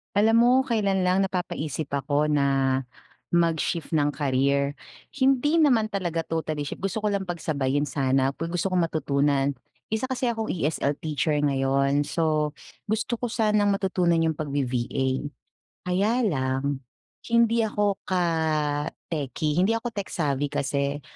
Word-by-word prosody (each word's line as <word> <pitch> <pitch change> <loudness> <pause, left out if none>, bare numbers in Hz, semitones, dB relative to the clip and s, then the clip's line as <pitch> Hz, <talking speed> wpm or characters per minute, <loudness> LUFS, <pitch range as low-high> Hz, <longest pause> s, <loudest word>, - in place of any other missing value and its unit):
Alam 220 +2 +4
mo - - +5
kailan 210 -7 0
lang 185 +2 +2
napapaisip 160 -5 -3
ako 145 +2 0
na 145 -2 +2 0.9
mag-shift 170 -1 +1
ng 145 0 +1
career. 140 0 +1 0.3
Hindi 275 +3 +2
naman 250 -9 +4
talaga 175 -5 -2
totally 155 -2 -3
shift 145 - -5
gusto 195 +3 -3
ko 210 - +1
lang 200 -1 -1
pagsabayin 145 -5 -1
sana, 135 -1 +1
ku 165 - -3
gusto 175 +3 -1
kong 180 -2 +2
matutunan. 140 -3 0 0.3
Isa 220 +4 -1
kasi 260 -1 -1
akong 225 -2 -2
ESL 150 -3 0
teacher 150 -1 0
ngayon, 140 0 +1
so 155 -2 0 0.3
gusto 220 +3 -1
ko 245 - -3
sanang 210 -3 +2
matutunan 180 -4 +1
yung 160 -2 0
pag-V-VA, 135 -3 -1 0.9
kaya 210 +7 +2
lang 135 - 0 0.5
hindi 235 0 +3
ako 205 -1 0
ka 185 -1 +1 0.9
techie 150 0 -2
hindi 195 +5 +3
ako 230 +1 -2
tech-savy 150 - -2
kasi, 140 +1 -2
165 Hz, 135 wpm, -25 LUFS, 140-205 Hz, 0.9 s, mo